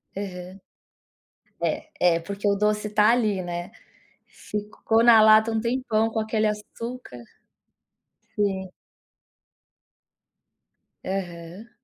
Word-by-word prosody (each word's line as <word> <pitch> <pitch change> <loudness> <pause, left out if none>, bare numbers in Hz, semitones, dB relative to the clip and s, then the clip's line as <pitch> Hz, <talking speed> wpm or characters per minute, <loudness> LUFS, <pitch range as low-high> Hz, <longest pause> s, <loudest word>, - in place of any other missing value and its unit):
Aham. 185 -1 -7 1.4
É, 175 -2 +4
é - - -3
porque 200 +4 -3
o 200 - +3
doce 210 +1 0
tá 210 +1 +4
ali, 215 -6 +1
né, 175 0 -5 0.6
ficou 210 +2 -2
na 230 -2 +7
lata 220 +1 +6
um 225 - 0
tempão 230 -2 0
com 220 - -2
aquele 220 0 0
açúcar. 215 - -6 1.2
Sim. 190 -2 -2 2.3
Aham. 180 +2 -6
210 Hz, 95 wpm, -24 LUFS, 190-220 Hz, 2.3 s, na